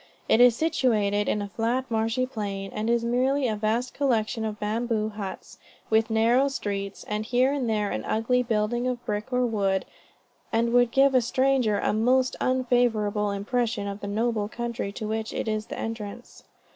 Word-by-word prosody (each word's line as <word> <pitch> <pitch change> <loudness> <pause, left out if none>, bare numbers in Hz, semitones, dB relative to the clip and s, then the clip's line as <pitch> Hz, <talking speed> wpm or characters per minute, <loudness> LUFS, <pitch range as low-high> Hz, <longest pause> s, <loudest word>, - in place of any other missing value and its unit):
It 225 - +4
is 245 -2 +7
situated 215 -10 +1
in 210 - 0
a - - -5
flat, 235 +5 -1
marshy 225 +3 +1
plain, 200 -5 -5
and 215 +2 -2
is 235 0 +2
merely 260 +3 +1
a 220 - -1
vast 225 +4 -1
collection 230 -5 0
of 215 -1 -4
bamboo 220 0 -1
huts, 205 -3 -8 0.3
with 220 +1 +3
narrow 230 +5 +3
streets, 200 -7 -4
and 210 0 -3
here 250 +4 +2
and 265 -5 -1
there 210 -2 0
an 110 - -3
ugly 240 +3 +1
building 235 +1 0
of 245 -1 -3
brick 210 +3 -3
or 250 0 +2
wood, 195 -4 0 0.7
and 235 +1 +1
would 245 -1 +5
give 270 +2 +4
a 255 - +5
stranger 255 -3 +2
a - - 0
most 250 +4 +2
unfavorable 240 -5 +1
impression 215 +1 -1
of 200 0 -5
the 200 - -6
noble 215 0 0
country 235 -3 -4
to 215 +1 -5
which 220 0 -3
it - - -3
is 215 0 -2
the - - -6
entrance. 225 +1 -7
225 Hz, 180 wpm, -26 LUFS, 210-245 Hz, 0.7 s, is